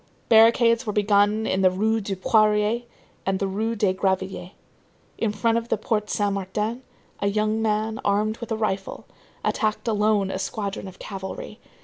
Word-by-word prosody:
Barricades 230 +1 +5
were 210 - -1
begun 205 +1 +3
in 190 - 0
the 185 - +6
Rue 220 +4 0
du 195 -1 -3
Poirier 215 +3 +2 0.4
and 195 0 0
the 195 - -1
Rue 220 +4 -2
des 205 -3 +2
Gravilliers. 190 -1 -2 0.7
In 225 - +1
front 225 +2 +1
of 230 0 -11
the - - +1
Porte 210 -2 -1
Saint 205 -1 0
Martin, 210 +5 -3 0.4
a 200 - 0
young 215 +2 0
man, 220 0 0
armed 210 +2 +1
with 235 -1 -7
a 220 - 0
rifle, 195 -3 -3 0.4
attacked 215 -1 -1
alone 210 -2 +2
a 190 - -3
squadron 200 -2 -4
of 190 - -11
cavalry. 195 - -7
210 Hz, 165 wpm, -24 LUFS, 195-220 Hz, 0.7 s, the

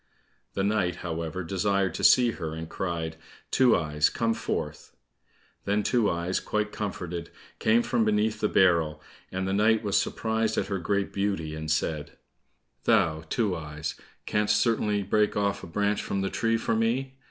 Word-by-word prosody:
The 95 - 0
knight, 100 -4 +1
however, 85 +2 -3
desired 95 +1 0
to - - -5
see 125 -2 +6
her, 80 -6 -5
and 80 0 -6
cried, 80 -3 -3 0.3
"Two 130 -3 +5
eyes, 75 -2 +1
come 115 -1 0
forth." - - -4 0.7
Then 105 +1 +1
Two 115 -1 +2
eyes, 85 +2 -1
quite 105 0 -2
comforted, 90 -5 -4 0.3
came 115 +2 +3
from 120 -3 +1
beneath 110 0 +1
the 105 - +2
barrel, 85 -5 +3 0.3
and 95 0 -2
the 95 - 0
knight 110 +2 +3
was 100 -2 0
surprised 110 -1 0
at - - 0
her 100 -2 -1
great 100 +3 -1
beauty, 100 -6 -1
and 80 0 -5
said, 75 -1 -1 0.7
"Thou, 80 -1 +3
Two 105 -6 +1
eyes, 75 -1 -5 0.3
canst 105 0 +2
certainly 105 -2 +1
break 105 +2 +1
off 100 -1 0
a - - -7
branch 105 +4 0
from 100 - -2
the 95 - -2
tree 115 -1 +1
for 115 - -1
me." 130 +4 -1
100 Hz, 165 wpm, -27 LUFS, 85-110 Hz, 0.7 s, see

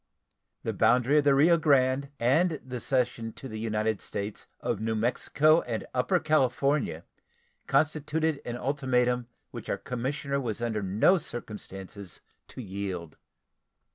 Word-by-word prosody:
The 110 - -2
boundary 125 +7 +4
of 145 - 0
the 140 -1 +5
Rio 165 +5 +5
Grande 140 -2 +3
and 155 +6 +2
the 125 -1 -5
cession 120 -3 -1
to 135 - -9
the 110 -3 -6
United 110 -1 -1
States 100 0 -4
of 120 -4 -2
New 110 0 -1
Mexico 140 +7 +3
and 115 -3 -4
Upper 130 +9 +2
California 140 -2 +1 0.6
constituted 155 0 +1
an 120 0 -4
ultimatum 125 -3 0 0.2
which - - -8
our - - 0
commissioner 140 +3 -3
was 115 -4 -3
under 115 -3 -1
no 105 - +3
circumstances 100 - -8 0.3
to 130 - -8
yield. 95 -5 -5
125 Hz, 135 wpm, -28 LUFS, 110-140 Hz, 0.6 s, the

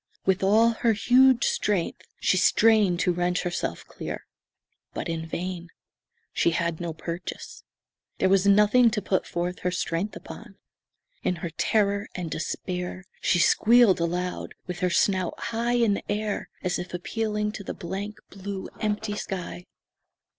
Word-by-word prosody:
With 190 -1 +2
all 215 +4 +5
her 230 0 +1
huge 250 +4 +5
strength 200 -5 0
she - - +2
strained 205 -1 +4
to 180 - +2
wrench 175 +1 0
herself 175 - -3
clear. - - -7 0.7
But - - -3
in 165 -1 -3
vain. 175 +1 -4 0.6
She - - +3
had 170 -1 -1
no 170 -1 -2
purchase. 170 +2 -7 0.5
There - - +2
was 195 +1 +3
nothing 210 +4 +6
to 215 -2 -2
put 190 -2 0
forth 175 +1 -3
her 180 - 0
strength 175 +2 -2
upon. 215 -3 -10 0.7
In 180 - 0
her 170 - -4
terror 200 +3 +1
and 175 -3 -4
despair 180 +2 -4 0.2
she 180 - +3
squealed 215 +3 +5
aloud, 180 +2 -2
with 180 -1 -5
her 185 -1 +1
snout 185 0 +1
high 235 +1 -1
in 225 -4 +2
air 210 0 -2
as 180 -1 0
if 180 0 -5
appealing 210 +3 -2
to 210 -1 -7
the - - -5
blank, 195 +4 -5
blue, 195 0 -6
empty 210 -1 -1
sky. 180 -3 -5
190 Hz, 145 wpm, -26 LUFS, 175-210 Hz, 0.7 s, nothing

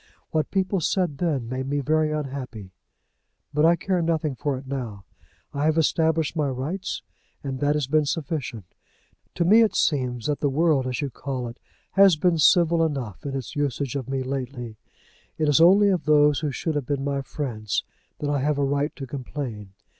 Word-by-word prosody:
What 155 -1 0
people 190 -1 0
said 170 -4 0
then 145 -9 0
made 130 +2 -3
me 145 +1 0
very 155 +2 +1
unhappy. 130 -9 -5 0.8
But 150 +2 +3
I 170 +1 +6
care 185 0 -1
nothing 160 -3 0
for 140 0 -2
it 135 - -9
now. 120 -7 -5 0.5
I 145 +1 -1
have 155 +1 +2
established 160 0 +2
my 150 -3 +1
rights, 145 +9 -4 0.4
and 135 -2 -4
that 145 +2 +2
has 150 -2 0
been 155 +3 +2
sufficient. 140 - -3 0.7
To 170 - +1
me 215 +6 +7
it 225 - +2
seems 125 -6 0
that 150 -1 0
the 145 - +1
world, 145 -2 +2
as 125 +1 -2
you 140 -2 -3
call 130 -3 -4
it, 115 - -12 0.3
has 195 -3 +6
been 165 +1 +1
civil 170 0 +5
enough 135 - -3
in 135 - -3
its 135 +2 -5
usage 140 -2 -1
of 135 -2 -4
me 135 -1 -1
lately. 130 -3 -5 0.6
It 155 - +1
is 150 +2 +4
only 200 +4 +7
of 185 -5 0
those 150 -2 +4
who 150 - -1
should 155 +4 -2
have 145 -4 -2
been 140 -2 -1
my 140 0 -1
friends 120 -7 -3 0.3
that 145 - -3
I 145 - +1
have 145 +2 0
a 140 - +1
right 145 +2 -1
to 135 - -6
complain. 125 -6 -6
145 Hz, 190 wpm, -24 LUFS, 130-160 Hz, 0.8 s, me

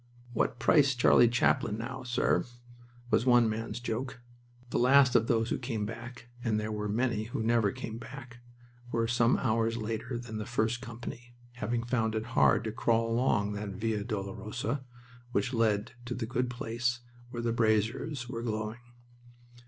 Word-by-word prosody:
"What 115 - 0
price 140 +1 +4
Charlie 120 -1 +6
Chaplin 115 -2 +2
now, 130 +3 -5
sir?" 125 -1 +1 0.7
was 120 - +3
one 120 -2 +6
man's 110 +2 -3
joke. 125 +2 -4 0.5
The - - +1
last 130 +1 +6
of 115 -1 +4
those 115 -1 +1
who - - 0
came 115 -4 -2
back 120 +2 -8 0.2
and 110 -3 +1
there 110 0 -3
were 105 -1 -3
many 115 0 0
who 115 0 -3
never 115 -3 +3
came 110 +3 -6
back 120 +1 -10 0.5
were 115 0 +1
some 120 0 +3
hours 115 -1 +1
later 115 +2 -3
than 115 -2 -6
the 105 - -5
first 120 0 0
company, 120 0 -8 0.2
having 120 -1 -1
found 115 -2 0
it 110 0 -1
hard - - +4
to 110 - -2
crawl 115 +1 +1
along 105 -4 +2
that 105 -1 -4
Via 110 0 -1
Dolorosa 110 +5 -3 0.5
which 125 +1 0
led 110 -3 +1
to 120 0 -3
the 120 - -2
good 120 +2 -1
place 120 -1 -2 0.3
where 120 -1 -5
the 115 -1 +1
braziers 115 +4 +1
were 115 -1 -4
glowing. 110 0 -3
115 Hz, 165 wpm, -30 LUFS, 110-120 Hz, 0.7 s, Charlie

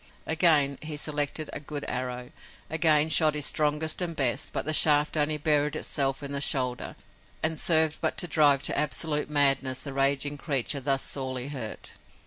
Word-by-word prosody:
Again 155 -4 +2
he 155 -1 -5
selected 150 +1 -2
a - - -5
good 145 0 -7
arrow, 125 -1 -5 0.4
again 160 -1 +2
shot 155 0 +3
his 150 -2 0
strongest 155 +2 0
and 170 -2 -3
best, 130 -5 0
but - - -4
the 155 - -1
shaft 150 0 +4
only 150 0 0
buried 150 -1 0
itself 135 -1 -2
in 140 - -6
the 140 0 -3
shoulder 125 -4 -1 0.5
and 160 -1 -1
served 160 -2 +3
but - - -2
to 175 - -2
drive 145 -3 +3
to - - 0
absolute 150 +1 -1
madness 135 -3 +2
the 140 - -6
raging 140 +1 0
creature 140 -1 0
thus 135 0 -1
sorely 130 -1 -2
hurt. 125 -7 -7
145 Hz, 170 wpm, -26 LUFS, 135-155 Hz, 0.5 s, shaft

